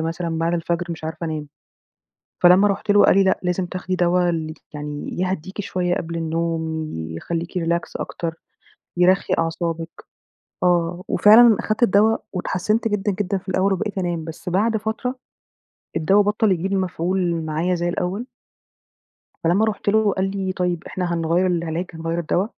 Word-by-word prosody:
مثلًا 165 0 -2
بعد 165 +1 0
الفجر 170 +1 -1
مش 160 -1 -6
عارفة 160 +1 -4
أنام. 155 -2 -4 1.0
فلمّا 185 +4 +7
رحت 200 +1 0
له 205 - +6
قال - - +5
لي: 195 - +6
"لأ، 190 - +2
لازم 180 +1 0
تاخدي 185 +1 -3
دوا 175 0 +2
ال 160 -2 -2
آآ، - - -6 0.2
يعني 150 +1 -6
يهديكِ 185 +1 -2
شوية 180 -3 -1
قبل 170 0 -4
النوم، 160 -1 -2
يخليكِ 165 - -4
Relax 170 +1 +1
أكتر، 165 -1 -4 0.6
يرخّي 185 +2 +3
أعصابِك". 165 0 -2 0.7
آه، 175 0 +1
وفعلًا 220 +1 +7
أخدت 215 +2 -2
الدوا 220 +1 +5 0.2
واتحسنت 210 +5 0
جدًا، 205 -1 0
جدًا 195 0 0
في 185 - -18
الأول 190 +1 +2
وبقيت 200 +1 -2
أنام، 175 -3 -2
بس 165 +2 -8
بعد 215 +5 +2
فترة 225 +4 -3 0.8
الدوا 195 +6 +4
بطَّل 210 0 +2
يجيب 185 +3 0
مفعول 180 -2 0
معايا 160 +4 0
زي 175 0 -1
الأول. 185 +7 -3 1.2
فلمّا 180 +6 +3
رُحت 210 -1 -3
له، 215 -1 +3
قال 190 0 -1
لي: 195 -1 -2
"طيب، 180 -2 -1
إحنا 180 -2 -2
هنغيَّر 170 +2 +1
العلاج، 170 0 -1
هنغيَّر 165 +1 -3
الدوا 175 +4 0
180 Hz, 155 wpm, -22 LUFS, 165-195 Hz, 1.2 s, فلمّا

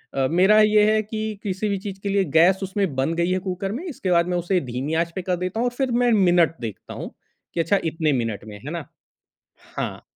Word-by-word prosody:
अ, 135 -1 +2
मेरा 190 +5 +5
ये 210 0 +5
है 215 - +3
कि 215 -1 -4
किसी 200 +1 -2
भी 200 - 0
चीज़ 195 -1 -7
के 200 - -1
लिए 195 0 +2
गैस 185 +3 +5
उसमें 190 -6 -1
बन 135 +5 0
गई 170 +1 +1
है 185 - +1
कुकर 190 +1 -4
में, 285 - -5
इसके 190 - -3
बाद 170 0 +3
मैं 180 -1 0
उसे 175 +1 +1
धीमी 135 +6 -3
आँच 170 0 0
पे 190 - -2
कर 180 0 -1
देता 185 +5 -3
हूँ 245 - +1
और 245 - -3
फ़िर 265 -2 -1
मैं 240 0 +3
मिनट 175 -2 +4
देखता 110 -4 -7
हूँ - - -7 0.4
कि - - -3
अच्छा 195 +5 +2
इतने 160 -1 0
मिनट 115 -4 -2
में 105 -1 -9
है 150 - -5
ना? 170 -5 -5 0.9
हाँ। - - -4
185 Hz, 240 wpm, -23 LUFS, 165-205 Hz, 0.9 s, मेरा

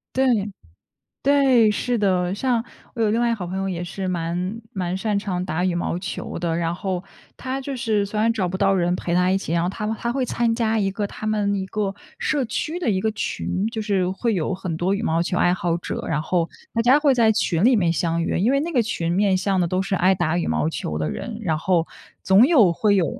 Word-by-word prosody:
对， 265 0 +3 1.0
对， 270 -5 +4
是 240 +3 -1
的。 185 -3 +1
像 235 +2 0 0.3
我 230 - -2
有 215 -2 +3
另 225 - +1
外 240 - +2
一 235 - +2
个 - - +1
好 190 -5 -5
朋 185 +2 -4
友 195 0 -1
也 175 -2 -3
是 190 +2 -5
蛮 180 +4 -2
蛮 185 -4 -2
擅 210 +1 -1
长 185 -3 -3
打 180 -1 -1
羽 180 -2 0
毛 175 0 -2
球 180 -2 -5
的。 170 -1 -1
然 165 0 -1
后 185 0 -3 0.3
她 260 +1 -4
就 275 0 -5
是 220 -5 0
虽 205 +2 -5
然 225 +2 +3
找 205 -5 -1
不 185 +2 -3
到 195 0 +3
人 175 -1 +1
陪 170 - -3
她 180 +1 +3
一 190 - +3
起， 195 - -5
然 170 0 +2
后 175 - 0
她 200 +3 -4
她 235 - -2
会 265 +1 -1
参 235 -1 0
加 225 -1 +1
一 195 -2 +1
个 205 +2 -3
他 215 +1 -6
们 210 -2 +1
一 195 -1 -2
个 200 0 -2 0.2
社 285 -4 0
区 305 +8 -3
的 340 - 0
一 190 -3 +1
个 220 +1 +1
群。 205 -1 -2
就 225 -1 -4
是 195 -4 0
会 225 +5 -1
有 175 +1 -1
很 180 -3 -4
多 185 +3 +1
羽 200 - -2
毛 165 -4 +1
球 175 +1 -1
爱 175 - +3
好 175 -2 -1
者， - - -5
然 150 -2 0
后 170 +1 0 0.2
大 230 - +1
家 250 +4 +5
会 290 -3 +3
在 230 -3 +4
群 180 -4 0
里 250 +1 +6
面 175 -6 +2
相 165 0 0
遇。 - - -1
因 205 +6 +2
为 275 - +2
那 335 +3 -3
个 255 -7 +3
群 170 -7 -2
面 195 +1 +2
向 190 0 0
的 175 - +2
都 185 +2 0
是 195 0 -1
爱 185 +2 +3
打 175 -2 0
羽 175 - -1
毛 155 - 0
球 75 - -4
的 75 0 -1
人， 70 - -5
然 165 -7 0
后 170 0 +1 0.4
总 195 +7 +6
有 240 - +5
会 205 +4 +2
有 185 - +3
195 Hz, 270 characters per minute, -22 LUFS, 175-225 Hz, 1.0 s, 里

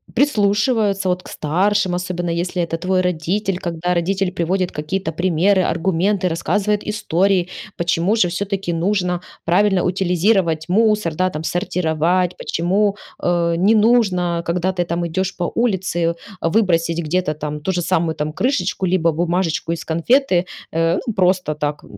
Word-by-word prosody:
прислушиваются 210 -5 +2
вот 180 0 0
к - - -14
старшим, 185 +4 0
особенно 175 -1 -2
если 175 +1 -1
это 165 0 -3
твой 185 0 +1
родитель, 180 +2 -1
когда 175 0 -2
родитель 185 +2 0
приводит 180 +1 -1
какие-то 160 +3 -3
примеры, 185 +3 +2
аргументы, 185 +3 0
рассказывает 205 +5 0
истории, 190 -3 +1 0.3
почему 170 +4 +1
же 185 -6 +2
все-таки 195 -1 -2
нужно 180 0 0 0.2
правильно 190 +2 +3
утилизировать 180 -2 +1
мусор, 210 -3 +2
да 185 +4 +1
там 155 -2 -6
сортировать, 175 0 0
почему 195 +4 0 0.3
э, 170 -1 +1
не 200 +6 +4
нужно, 195 -7 +2
когда 180 +3 -1
ты 175 -1 -1
там 170 0 -2
идешь 185 +3 -2
по 175 - -2
улице, 185 -7 0 0.3
выбросить 170 -3 +1
где-то 165 -1 -1
там 150 0 -5
ту 190 - -1
же 175 - -1
самую 165 -2 0
там 150 +1 -3
крышечку 190 - 0
либо 170 -2 +2
бумажечку 170 0 -1
из 165 - -4
конфеты, 180 - +2 0.2
э, 165 +1 +1
ну 230 - -2
просто 185 -4 +1
так 150 0 -3
180 Hz, 145 wpm, -19 LUFS, 170-195 Hz, 0.3 s, не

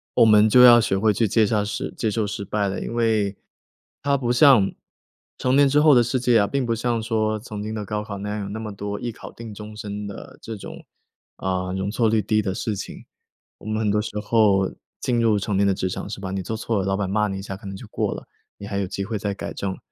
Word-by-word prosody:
我 - - +6
们 105 0 +6
就 125 - +7
要 120 -1 +9
学 95 - 0
会 105 +1 +3
去 115 +1 +1
接 110 +2 +3
下 105 -1 +1
失 105 - -4
接 110 - -1
受 110 0 0
失 100 0 -4
败 100 +1 -1
了， 95 - -4
因 - - -5
为 110 -4 +1 0.7
它 140 -1 +2
不 120 -2 -1
像 125 -7 +6 0.7
成 130 +1 +1
年 140 0 +5
之 145 +2 +4
后 150 -2 +6
的 120 - +6
世 125 +2 -1
界 120 -2 +4
啊， 100 - +2
并 135 +1 -1
不 115 - 0
像 120 0 -1
说 110 -1 0
曾 105 -2 -7
经 110 +1 -4
的 105 -2 -4
高 105 0 -3
考 100 -2 -6
那 105 +1 -4
样， 105 - -3
有 100 - -6
那 110 +2 -5
么 110 -1 -5
多 100 +1 -5
一 120 - -3
考 110 - -11
定 115 -2 -9
终 105 +1 -9
身 105 -1 -5
的 100 - -10
这 115 - -6
种， - - -10 0.5
啊， 95 -1 -2
容 95 +2 -2
错 115 -1 +2
率 110 - +2
低 110 +1 +1
的 95 -2 -2
事 110 +2 -2
情。 95 - -8 0.5
我 - - -15
们 110 0 -1
很 105 -2 +1
多 105 0 +2
时 110 - -4
候 105 -3 +3 0.3
进 120 -2 0
入 110 -2 +3
成 100 +1 -2
年 100 0 +3
的 - - +4
职 95 - -2
场 95 - -5
是 105 - -6
吧， 95 -1 -5
你 95 0 -2
做 110 +4 -4
错 110 -2 -1
了， 95 - -1
老 95 0 0
板 100 -2 -1
骂 105 +1 +1
你 95 -1 -4
一 95 - -7
下 95 - -6
可 100 - -11
能 95 - -6
就 - - -10
过 - - -1
了， - - -8 0.3
你 100 - -9
还 100 -1 -3
有 95 - -1
机 100 +1 -4
会 110 0 -3
再 100 0 -2
改 - - -6
正。 95 -1 -4
105 Hz, 290 characters per minute, -23 LUFS, 100-115 Hz, 0.7 s, 要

